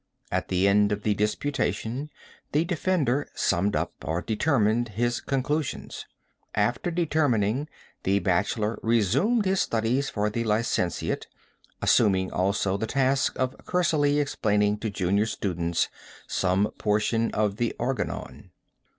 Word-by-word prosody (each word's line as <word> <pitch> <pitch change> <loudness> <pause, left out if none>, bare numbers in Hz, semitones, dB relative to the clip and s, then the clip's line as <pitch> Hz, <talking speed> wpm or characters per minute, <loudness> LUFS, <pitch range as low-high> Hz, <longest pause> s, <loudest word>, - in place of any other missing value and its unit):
At - - -1
the 95 +1 +2
end 105 +1 +4
of 105 0 -2
the 105 - +2
disputation, 115 +4 -1 0.4
the 155 +3 +3
defender 160 -6 0
summed 100 +4 +1
up, - - -1
or 80 +5 -2
determined, 115 -1 +1
his 120 +1 0
conclusions. 140 +2 -2 0.5
After 120 +10 +1
determining, 145 - +1 0.3
the 100 +1 +2
bachelor 105 +4 0
resumed 125 - +2
his 190 0 +2
studies 115 +5 0
for 105 0 -1
the 115 +2 -1
licentiate, 105 -5 -1 0.6
assuming 95 -4 +3
also 95 +1 0
the 110 +2 -2
task 135 +1 +1
of 130 +1 -1
cursorily 150 -5 +2
explaining 105 -7 +1
to 110 - -2
junior 100 +2 +1
students 85 -6 -1 0.4
some 95 +3 +1
portion 110 +2 +1
of 105 -1 +1
the 120 0 -1
Organon. 125 +2 -4
110 Hz, 125 wpm, -26 LUFS, 105-140 Hz, 0.6 s, end